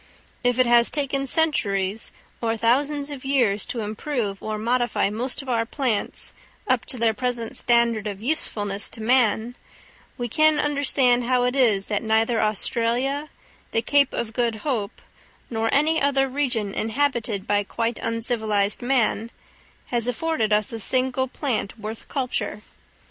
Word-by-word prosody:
If 245 Hz, -1 st, +2 dB
it 255 Hz, -, +4 dB
has 235 Hz, 0 st, +5 dB
taken 275 Hz, -2 st, -1 dB
centuries 215 Hz, -10 st, 0 dB, 0.3 s
or 225 Hz, -1 st, 0 dB
thousands 280 Hz, +5 st, +1 dB
of 275 Hz, -3 st, -7 dB
years 245 Hz, -8 st, +1 dB
to 235 Hz, -, -3 dB
improve 215 Hz, -1 st, -3 dB
or 215 Hz, 0 st, -3 dB
modify 240 Hz, -1 st, 0 dB
most 250 Hz, +6 st, -1 dB
of -, -, -14 dB
our 235 Hz, -3 st, +1 dB
plants 240 Hz, -3 st, -2 dB, 0.3 s
up 255 Hz, -2 st, +1 dB
to 255 Hz, -, -5 dB
their 230 Hz, -1 st, +2 dB
present 245 Hz, -1 st, -3 dB
standard 235 Hz, -3 st, +2 dB
of 200 Hz, -2 st, -5 dB
usefulness 205 Hz, -6 st, 0 dB
to 225 Hz, -, -6 dB
man, 235 Hz, -1 st, +2 dB, 0.6 s
we 240 Hz, -, -2 dB
can 310 Hz, +5 st, +3 dB
understand 270 Hz, -4 st, +2 dB
how 250 Hz, 0 st, +2 dB
it 250 Hz, +1 st, 0 dB
is 220 Hz, -7 st, +3 dB
that 205 Hz, -2 st, -1 dB
neither 225 Hz, +1 st, +2 dB
Australia, 240 Hz, +7 st, 0 dB, 0.4 s
the 225 Hz, -, +1 dB
Cape 285 Hz, +2 st, +3 dB
of 225 Hz, -2 st, -4 dB
Good 235 Hz, -1 st, 0 dB
Hope, 230 Hz, -9 st, -3 dB, 0.5 s
nor 225 Hz, 0 st, 0 dB
any 315 Hz, +3 st, +3 dB
other 275 Hz, -1 st, +2 dB
region 250 Hz, -7 st, -1 dB
inhabited 225 Hz, -4 st, -1 dB
by 205 Hz, 0 st, +1 dB
quite 230 Hz, +3 st, -2 dB
uncivilised 220 Hz, -3 st, 0 dB
man, 240 Hz, -3 st, +1 dB, 0.6 s
has 240 Hz, -1 st, 0 dB
afforded 250 Hz, -3 st, -1 dB
us 210 Hz, +1 st, +2 dB
a 225 Hz, -, -4 dB
single 260 Hz, +3 st, +1 dB
plant 250 Hz, -6 st, -3 dB
worth 215 Hz, +1 st, -7 dB
culture. 255 Hz, -5 st, -2 dB
235 Hz, 150 wpm, -23 LUFS, 220-265 Hz, 0.6 s, has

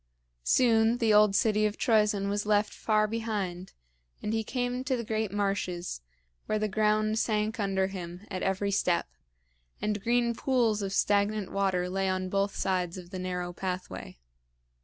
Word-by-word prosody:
Soon 230 Hz, -1 st, +4 dB
the 225 Hz, -3 st, +3 dB
old 210 Hz, -1 st, +5 dB
city 215 Hz, 0 st, +3 dB
of 210 Hz, -, -5 dB
Troezen 210 Hz, -3 st, +2 dB
was 205 Hz, +1 st, -1 dB
left 210 Hz, 0 st, +2 dB
far 215 Hz, -1 st, +2 dB
behind, 205 Hz, -5 st, -3 dB, 0.5 s
and 210 Hz, -, -3 dB
he 225 Hz, 0 st, 0 dB
came 250 Hz, +2 st, -2 dB
to 265 Hz, -2 st, 0 dB
the 235 Hz, -, -3 dB
great 220 Hz, -2 st, -2 dB
marshes, 195 Hz, -, -2 dB, 0.5 s
where 215 Hz, -, +1 dB
the 215 Hz, 0 st, 0 dB
ground 215 Hz, +1 st, +1 dB
sank 215 Hz, +1 st, 0 dB
under 195 Hz, -2 st, +1 dB
him 180 Hz, -2 st, -6 dB
at 185 Hz, -1 st, -3 dB
every 195 Hz, +1 st, 0 dB
step, 180 Hz, -3 st, +1 dB, 0.7 s
and 210 Hz, -1 st, -1 dB
green 235 Hz, +2 st, +2 dB
pools 230 Hz, -4 st, +1 dB
of 195 Hz, -1 st, -3 dB
stagnant 205 Hz, 0 st, +1 dB
water 190 Hz, -2 st, 0 dB
lay 190 Hz, +1 st, -1 dB
on 185 Hz, 0 st, -1 dB
both 200 Hz, +1 st, 0 dB
sides 180 Hz, -2 st, -1 dB
of 175 Hz, -1 st, -10 dB
the 185 Hz, -, -5 dB
narrow 180 Hz, -1 st, -3 dB
pathway. 185 Hz, -, -5 dB
205 Hz, 160 wpm, -29 LUFS, 190-220 Hz, 0.7 s, old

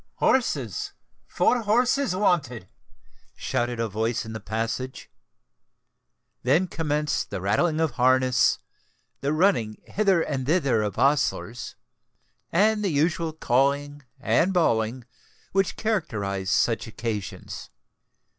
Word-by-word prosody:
"Horses! 140 Hz, -, 0 dB, 0.3 s
four 245 Hz, -, +2 dB
horses 245 Hz, +2 st, +2 dB
wanted!" 145 Hz, -, 0 dB, 0.7 s
shouted 120 Hz, 0 st, -2 dB
a 115 Hz, -, 0 dB
voice 110 Hz, +3 st, -2 dB
in 110 Hz, -, -7 dB
the 110 Hz, -, -5 dB
passage. 115 Hz, +5 st, -4 dB, 1.3 s
Then 150 Hz, +9 st, +3 dB
commenced 150 Hz, -4 st, -1 dB
the -, -, -4 dB
rattling 130 Hz, -, +1 dB
of 160 Hz, -3 st, +1 dB
harness,—the 130 Hz, +2 st, 0 dB
running 155 Hz, -, +1 dB
hither 195 Hz, -5 st, +2 dB
and 135 Hz, -3 st, -3 dB
thither 140 Hz, -9 st, +2 dB
of 105 Hz, -2 st, -3 dB
ostlers,—and 150 Hz, -, -1 dB
the 200 Hz, -, +1 dB
usual 165 Hz, +2 st, +1 dB
calling 145 Hz, 0 st, 0 dB, 0.2 s
and 170 Hz, +6 st, +2 dB
bawling 120 Hz, -8 st, +1 dB, 0.5 s
which 195 Hz, -1 st, +1 dB
characterise 110 Hz, -, -2 dB
such 115 Hz, +4 st, +1 dB
occasions. 110 Hz, -3 st, -5 dB
140 Hz, 100 wpm, -25 LUFS, 115-175 Hz, 1.3 s, Then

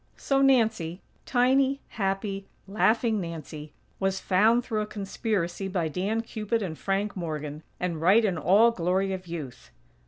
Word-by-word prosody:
So 275 Hz, -1 st, +1 dB
Nancy, 220 Hz, -10 st, +2 dB, 0.3 s
tiny, 265 Hz, +2 st, +3 dB
happy, 195 Hz, -1 st, -2 dB, 0.2 s
laughing 220 Hz, +1 st, +2 dB
Nancy, 155 Hz, -3 st, -7 dB, 0.3 s
was 195 Hz, 0 st, 0 dB
"found" 220 Hz, +6 st, +3 dB
through 215 Hz, -3 st, -1 dB
a 210 Hz, -, -3 dB
conspiracy 195 Hz, -3 st, -2 dB
by 180 Hz, -4 st, -1 dB
Dan 200 Hz, +8 st, -1 dB
Cupid 220 Hz, 0 st, -2 dB
and 165 Hz, -5 st, -4 dB
Frank 195 Hz, +4 st, -2 dB
Morgan; 155 Hz, -4 st, -5 dB, 0.2 s
and 170 Hz, -3 st, -2 dB
right 200 Hz, +7 st, +5 dB
in 190 Hz, -4 st, +1 dB
all 205 Hz, +8 st, +5 dB
glory 190 Hz, 0 st, 0 dB
of 185 Hz, -1 st, -6 dB
youth. 155 Hz, -7 st, -7 dB
195 Hz, 145 wpm, -27 LUFS, 175-220 Hz, 0.3 s, right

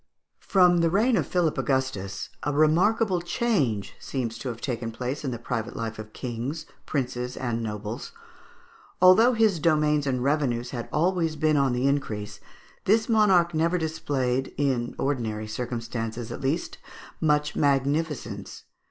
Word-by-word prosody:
From 180 Hz, -2 st, +4 dB
the 165 Hz, 0 st, +3 dB
reign 220 Hz, +8 st, +3 dB
of -, -, 0 dB
Philip 175 Hz, -4 st, +1 dB
Augustus, 120 Hz, -8 st, -2 dB
a 150 Hz, -, -1 dB
remarkable 180 Hz, +6 st, +3 dB
change 170 Hz, -, 0 dB
seems 115 Hz, -4 st, -4 dB
to 125 Hz, -, -4 dB
have 115 Hz, -2 st, -6 dB
taken 120 Hz, -3 st, -3 dB
place 125 Hz, +6 st, -4 dB
in 135 Hz, -, -1 dB
the 120 Hz, -, -3 dB
private 115 Hz, 0 st, -4 dB
life 115 Hz, -1 st, -4 dB
of 110 Hz, 0 st, -8 dB
kings, 125 Hz, +7 st, -5 dB, 0.2 s
princes, 125 Hz, -3 st, -2 dB
and 120 Hz, -3 st, -2 dB
nobles. 105 Hz, 0 st, -5 dB, 0.9 s
Although 200 Hz, +7 st, +7 dB
his 220 Hz, -6 st, +3 dB
domains 150 Hz, -2 st, +2 dB
and 125 Hz, -2 st, 0 dB
revenues 125 Hz, -4 st, 0 dB
had 120 Hz, -3 st, -5 dB
always 165 Hz, 0 st, +1 dB
been 155 Hz, 0 st, +2 dB
on 135 Hz, -3 st, +2 dB
the 125 Hz, +2 st, 0 dB
increase, 105 Hz, -7 st, -1 dB, 0.5 s
this 220 Hz, +3 st, +3 dB
monarch 190 Hz, -6 st, +4 dB
never 165 Hz, +3 st, +2 dB
displayed, 135 Hz, -6 st, -1 dB
in 130 Hz, -4 st, 0 dB
ordinary 115 Hz, -6 st, -2 dB
circumstances 115 Hz, 0 st, -4 dB
at -, -, -6 dB
least, 140 Hz, +6 st, -2 dB, 0.4 s
much 150 Hz, -1 st, +2 dB
magnificence. 145 Hz, +2 st, -1 dB
140 Hz, 145 wpm, -26 LUFS, 120-165 Hz, 0.9 s, Although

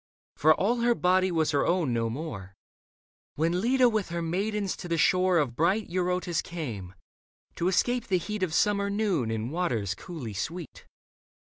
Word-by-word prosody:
For 155 Hz, +2 st, +5 dB
all 230 Hz, +6 st, +1 dB
her 235 Hz, 0 st, +2 dB
body 185 Hz, 0 st, +2 dB
was 160 Hz, -3 st, +1 dB
her 145 Hz, -, +2 dB
own 170 Hz, -8 st, +1 dB
no 115 Hz, -1 st, 0 dB
more), 110 Hz, -, -6 dB, 0.8 s
When 165 Hz, +4 st, +1 dB
Leda 250 Hz, +3 st, +4 dB
with 215 Hz, -6 st, 0 dB
her 170 Hz, 0 st, -3 dB
maidens 200 Hz, +4 st, -1 dB
to -, -, -7 dB
the 170 Hz, -1 st, 0 dB
shore 185 Hz, +2 st, +3 dB
Of 140 Hz, -7 st, 0 dB
bright 185 Hz, -, +1 dB
Eurotas 180 Hz, -2 st, 0 dB
came, 110 Hz, -, -6 dB, 0.6 s
to 170 Hz, -, -1 dB
escape 240 Hz, +5 st, +1 dB
the 190 Hz, -, +2 dB
heat 210 Hz, +4 st, -4 dB
Of 185 Hz, -3 st, 0 dB
summer 200 Hz, +4 st, +2 dB
noon 200 Hz, -, 0 dB
in 110 Hz, +2 st, -3 dB
waters 120 Hz, -, -1 dB
coolly 130 Hz, -, -7 dB
sweet. 165 Hz, -, -6 dB
175 Hz, 170 wpm, -28 LUFS, 145-195 Hz, 0.8 s, For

